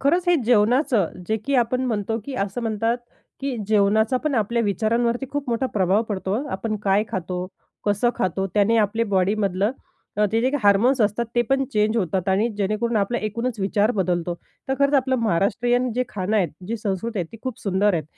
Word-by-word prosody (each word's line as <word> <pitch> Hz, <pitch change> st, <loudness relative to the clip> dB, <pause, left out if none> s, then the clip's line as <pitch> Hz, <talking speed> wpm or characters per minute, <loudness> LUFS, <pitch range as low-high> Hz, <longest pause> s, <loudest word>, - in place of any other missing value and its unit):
खरंच 345 Hz, +6 st, +2 dB
हे 350 Hz, -, +6 dB
जेवणाचं, 235 Hz, -, +3 dB, 0.2 s
जे 220 Hz, -, +2 dB
की 280 Hz, -, 0 dB
आपण 250 Hz, +1 st, +2 dB
म्हणतो, 225 Hz, -1 st, -1 dB
की 275 Hz, -, -6 dB
असं 200 Hz, +2 st, -2 dB
म्हणतात, 225 Hz, +2 st, 0 dB, 0.4 s
की 270 Hz, -2 st, -2 dB
जेवणाचा 215 Hz, +3 st, +3 dB
पण 295 Hz, -3 st, +1 dB
आपल्या 230 Hz, +1 st, +1 dB
विचारांवरती 230 Hz, +5 st, 0 dB
खूप 285 Hz, -2 st, -3 dB
मोठा 235 Hz, +3 st, 0 dB
प्रभाव 195 Hz, +2 st, +3 dB
पडतो. 195 Hz, -1 st, -2 dB, 0.2 s
आपण 215 Hz, +2 st, -2 dB
काय 200 Hz, +2 st, +3 dB
खातो? 180 Hz, 0 st, -3 dB, 0.4 s
कसं 205 Hz, +4 st, +2 dB
खातो? 190 Hz, -3 st, -1 dB
त्याने 210 Hz, +2 st, +3 dB
आपले 225 Hz, +1 st, +2 dB
बॉडीमधलं 195 Hz, +1 st, +1 dB, 0.5 s
अ, 210 Hz, -, +3 dB
ते 225 Hz, -, +2 dB
जे 255 Hz, -, +2 dB
काही 290 Hz, -1 st, -1 dB
हार्मोन्स 220 Hz, +6 st, +4 dB
असतात, 210 Hz, +2 st, +1 dB
ते 240 Hz, -, +4 dB
पण 270 Hz, 0 st, +2 dB
चेंज 215 Hz, +2 st, +2 dB
होतात 185 Hz, -2 st, -1 dB
आणि 200 Hz, +5 st, +2 dB
जेणेकरून 215 Hz, +3 st, 0 dB
आपला 210 Hz, +4 st, 0 dB
एकूणच 230 Hz, +2 st, -3 dB
विचार 205 Hz, +3 st, +2 dB
बदलतो. 175 Hz, -2 st, 0 dB, 0.3 s
तर 265 Hz, -, +1 dB
खरंच 280 Hz, +1 st, +3 dB
आपलं 260 Hz, -1 st, +2 dB
महाराष्ट्रीयन 240 Hz, +4 st, +1 dB
जे 250 Hz, +1 st, +1 dB
खाणं 205 Hz, +2 st, -1 dB
आहेत, 180 Hz, -6 st, +2 dB, 0.2 s
जी 230 Hz, +3 st, -2 dB
संस्कृती 210 Hz, +1 st, -3 dB
आहे 175 Hz, -, -1 dB
ती 225 Hz, -, -9 dB
खूप 255 Hz, -3 st, -4 dB
सुंदर 200 Hz, 0 st, +2 dB
आहेत. 160 Hz, -, -1 dB
220 Hz, 190 wpm, -23 LUFS, 200-245 Hz, 0.5 s, हे